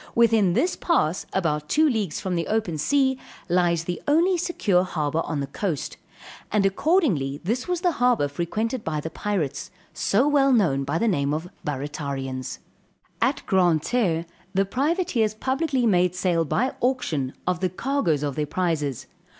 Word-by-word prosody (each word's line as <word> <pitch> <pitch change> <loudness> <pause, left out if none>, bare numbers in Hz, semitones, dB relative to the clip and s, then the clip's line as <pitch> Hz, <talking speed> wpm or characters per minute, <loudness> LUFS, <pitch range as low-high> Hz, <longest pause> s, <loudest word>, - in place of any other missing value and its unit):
Within 225 -6 +4
this 325 - +1
pass 185 - 0
about 150 -5 -1
two 310 +1 +4
leagues 215 - -1
from 185 - -3
the 170 -1 -1
open 210 -8 -1
sea, 265 - +2 0.3
lies 175 -2 +2
the 175 +1 -4
only 335 +6 +4
secure 230 - +1
harbor 155 -3 -1
on 150 -3 -2
the - - -1
coast, 150 +1 -3 0.5
and 205 -2 +2
accordingly 195 - +1
this 235 - -1
was 360 -1 -1
the 360 -1 +3
harbor 245 - +2
frequented 215 - -2
by 155 -2 -2
the 160 +2 -5
Pirates, 190 -10 -2 0.2
so 200 +9 +2
well 280 -2 +4
known 160 - +2
by 145 +4 -1
the 230 - +1
name 145 -7 +1
of 160 +3 -4 0.2
Barratarians. 140 -2 -4 0.6
At - - +1
Grand 175 -5 +3
Jerre, 175 -10 +1 0.3
the 195 +1 +3
privateers 255 - 0
publicly 265 +2 0
made 180 -4 +3
sale 175 -3 +1
by 250 - 0
auction, 165 - -1
of 180 -2 0
the 185 - 0
cargoes 185 - 0
of 145 -1 -1
their 150 +2 -2
prizes. 150 -6 -1
185 Hz, 160 wpm, -24 LUFS, 155-250 Hz, 0.6 s, Within